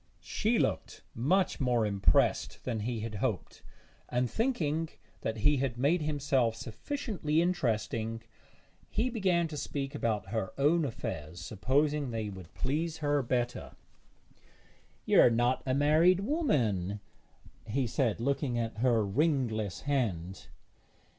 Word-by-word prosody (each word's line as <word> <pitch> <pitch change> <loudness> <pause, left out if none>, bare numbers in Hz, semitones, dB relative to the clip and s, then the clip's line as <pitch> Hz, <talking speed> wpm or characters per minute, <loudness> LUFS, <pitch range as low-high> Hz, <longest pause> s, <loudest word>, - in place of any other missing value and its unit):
She 225 +2 0
looked - - -1
much 180 +13 +1
more 125 -5 +2
impressed 100 -2 +2
than 115 -3 -2
he 115 +1 -2
had 110 0 -5
hoped; 105 -1 -3 0.5
and 125 +1 +1
thinking 165 - 0 0.3
that 110 0 -2
he 145 +7 +3
had 130 -3 -1
made 150 +7 +2
himself 140 -6 +1
sufficiently 160 - -2
interesting, 115 -9 -1 0.7
he 245 +4 0
began 185 -7 +1
to 155 - -6
speak 140 -1 -4
about 110 -8 -1
her 110 -3 -2
own 150 +4 +3
affairs, 85 - -5
supposing 135 - 0
they 110 -2 -3
would 95 -3 -10
please 160 +4 -1
her 145 -2 +1
better. 120 -1 -2 1.3
'You - - +6
are - - +7
not 120 +2 +1
a 130 - +2
married 160 +6 +4
woman?' 115 - 0 0.7
he 130 +4 0
said, 120 -2 0
looking 135 0 0
at 115 -2 -2
her 115 -3 +3
ringless 110 - 0
hand. 95 -11 -2
130 Hz, 125 wpm, -31 LUFS, 110-150 Hz, 1.3 s, are